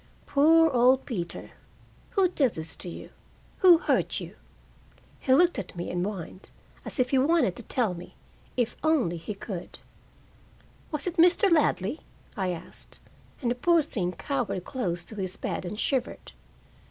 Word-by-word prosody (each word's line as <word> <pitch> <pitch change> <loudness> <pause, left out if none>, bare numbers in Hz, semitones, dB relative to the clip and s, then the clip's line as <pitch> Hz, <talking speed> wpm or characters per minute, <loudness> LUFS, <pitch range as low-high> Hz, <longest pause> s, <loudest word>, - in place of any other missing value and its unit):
"Poor 320 +3 +5
old 255 +1 +4
Peter! 180 -9 -5 0.7
Who 380 -2 +5
did 275 -9 +1
this 160 0 -4
to 180 - -3
you? - - -9 0.5
Who 360 -3 +8
hurt - - 0
you?" - - -9 0.8
He 260 - -1
looked 345 +3 +4
at 190 - -7
me 175 - -4
and 175 0 -1
whined, 190 -2 -6 0.3
as - - -7
if 255 - +2
he 265 - +4
wanted 275 - +3
to - - -4
tell 230 -7 -1
me, 175 0 -10 0.4
if 245 -2 0
only 280 - +2
he 200 +5 -6
could. 195 -3 -7 1.1
"Was 300 -2 -3
it 360 -1 -3
Mr. 355 +3 +5
Ladley?" 290 - +2 0.4
I 190 -4 -1
asked, 175 -2 -8 0.4
and 240 - +1
the - - +3
poor 330 +6 +3
thing 180 -11 -3
cowered 245 -10 -2
close 175 -10 -3
to 215 - -10
his 185 -1 -4
bed - - -3
and 210 +4 -5
shivered. 260 -2 -2
245 Hz, 160 wpm, -27 LUFS, 185-305 Hz, 1.1 s, Who